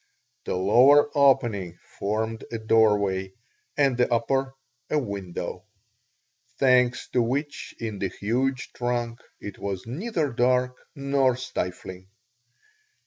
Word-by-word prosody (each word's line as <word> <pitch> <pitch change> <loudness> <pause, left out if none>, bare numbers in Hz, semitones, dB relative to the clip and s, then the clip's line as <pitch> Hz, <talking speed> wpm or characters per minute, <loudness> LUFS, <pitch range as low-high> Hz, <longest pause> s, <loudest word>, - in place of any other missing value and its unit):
The - - -2
lower 130 +11 +5
opening 115 - +2 0.2
formed 110 +2 -2
a 115 - -2
doorway 105 -4 +2 0.4
and 135 -4 +3
the 125 0 +2
upper 135 +3 0 0.3
a 155 - +1
window, 100 -6 -5 0.9
thanks 125 -2 +3
to 125 - +1
which 140 +5 -3
in 110 -3 -5
the 95 - 0
huge 125 +8 -2
trunk 120 -1 -2 0.2
it 105 - -8
was 95 -2 -4
neither 155 - -2
dark 125 +1 +2 0.2
nor 140 -2 +1
stifling. 95 -7 -5
120 Hz, 110 wpm, -25 LUFS, 100-135 Hz, 0.9 s, lower